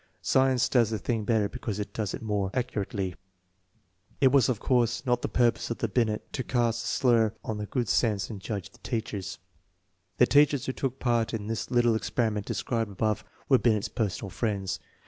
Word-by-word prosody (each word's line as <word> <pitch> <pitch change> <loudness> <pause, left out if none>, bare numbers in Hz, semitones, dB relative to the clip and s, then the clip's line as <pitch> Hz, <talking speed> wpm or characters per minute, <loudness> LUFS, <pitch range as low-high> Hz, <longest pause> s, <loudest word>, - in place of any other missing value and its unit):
Science 130 -2 +3
does 120 -4 +3
the 110 - -1
thing 110 +1 -2
better, 110 -2 +2
because 105 0 -5
it 105 - -5
does 105 -4 -2
it - - -9
more 105 -3 0
accurately. 105 -6 -2 1.1
It 135 - +6
\\tts 135 -2 +4
of 120 -5 0
course 120 -1 +1
not 125 -1 +1
the - - -1
purpose 120 -2 +1
of 115 - -2
Binct 110 -1 0
to 130 - -2
cast 120 -2 0
a - - -4
slur 120 -3 +3
upon 105 0 -6
the 105 - -4
good 120 -1 -1
sense 105 -4 +1
and 105 -4 -7
judgment 100 -2 -5
of - - -36
teachers. 105 -5 -4 0.8
The 125 - +6
teach 145 +2 +5
ers 130 - -4
who 130 - -2
took 130 -1 -3
part 120 -3 +1
in 105 -2 -5
the 110 0 -3
little 120 -2 +3
experiment 110 -2 -1
described 115 -4 -2
above 110 +2 -1 0.2
were 130 -3 +5
Kind's 110 -4 +2
personal 100 -3 -2
friends. 100 -1 -2
115 Hz, 190 wpm, -28 LUFS, 105-120 Hz, 1.1 s, It